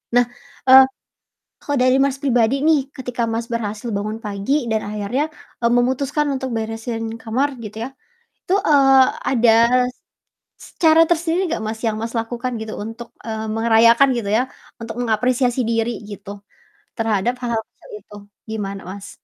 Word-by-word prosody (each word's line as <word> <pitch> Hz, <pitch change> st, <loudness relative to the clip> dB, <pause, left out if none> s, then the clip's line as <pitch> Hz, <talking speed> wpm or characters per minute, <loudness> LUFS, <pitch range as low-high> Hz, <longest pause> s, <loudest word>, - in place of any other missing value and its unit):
Nah, 245 Hz, -, +5 dB, 0.4 s
eee, 265 Hz, 0 st, +10 dB, 0.8 s
kalau 285 Hz, -1 st, -2 dB
dari 255 Hz, +1 st, +4 dB
Mas 275 Hz, -1 st, 0 dB
pribadi 245 Hz, -2 st, +2 dB
nih, 315 Hz, -2 st, +5 dB, 0.2 s
ketika 250 Hz, -2 st, -4 dB
Mas 230 Hz, +1 st, -2 dB
berhasil 215 Hz, 0 st, -3 dB
bangun 215 Hz, +2 st, -3 dB
pagi 200 Hz, +5 st, -3 dB, 0.2 s
dan 220 Hz, -1 st, +1 dB
akhirnya, 210 Hz, +7 st, -1 dB, 0.4 s
eee, 235 Hz, -, +3 dB
memutuskan 270 Hz, +4 st, +1 dB
untuk 265 Hz, 0 st, -3 dB
beresin 225 Hz, +1 st, -4 dB, 0.2 s
kamar 250 Hz, +6 st, 0 dB, 0.2 s
gitu 215 Hz, +1 st, -9 dB
ya. -, -, -4 dB, 0.6 s
Itu, 370 Hz, -, 0 dB
eee, 270 Hz, -5 st, +5 dB, 0.2 s
ada 235 Hz, -3 st, +4 dB, 1.1 s
s -, -, -12 dB, 0.2 s
cara 320 Hz, 0 st, +7 dB
tersendiri 345 Hz, +1 st, +1 dB
nggak 275 Hz, -, -2 dB
Mas 220 Hz, 0 st, -4 dB
yang 215 Hz, -, -1 dB
Mas 230 Hz, +1 st, -4 dB
lakukan 240 Hz, +2 st, -4 dB
gitu 220 Hz, 0 st, -6 dB
untuk, 225 Hz, +1 st, -8 dB, 0.2 s
eee, 220 Hz, 0 st, -3 dB
merayakan 230 Hz, +3 st, +5 dB
gitu 205 Hz, -4 st, -3 dB
ya, 250 Hz, -, +2 dB, 0.4 s
untuk 225 Hz, -1 st, -6 dB
mengapresiasi 245 Hz, +2 st, +1 dB
diri 230 Hz, +1 st, 0 dB, 0.2 s
gitu 200 Hz, -1 st, -9 dB, 0.7 s
terhadap 225 Hz, +1 st, 0 dB
hal-hal 230 Hz, -2 st, -1 dB
kecil -, -, -21 dB
itu, 210 Hz, -, -14 dB, 0.3 s
gimana 200 Hz, -3 st, -4 dB
Mas? 195 Hz, 0 st, -8 dB
235 Hz, 150 wpm, -20 LUFS, 220-260 Hz, 1.1 s, eee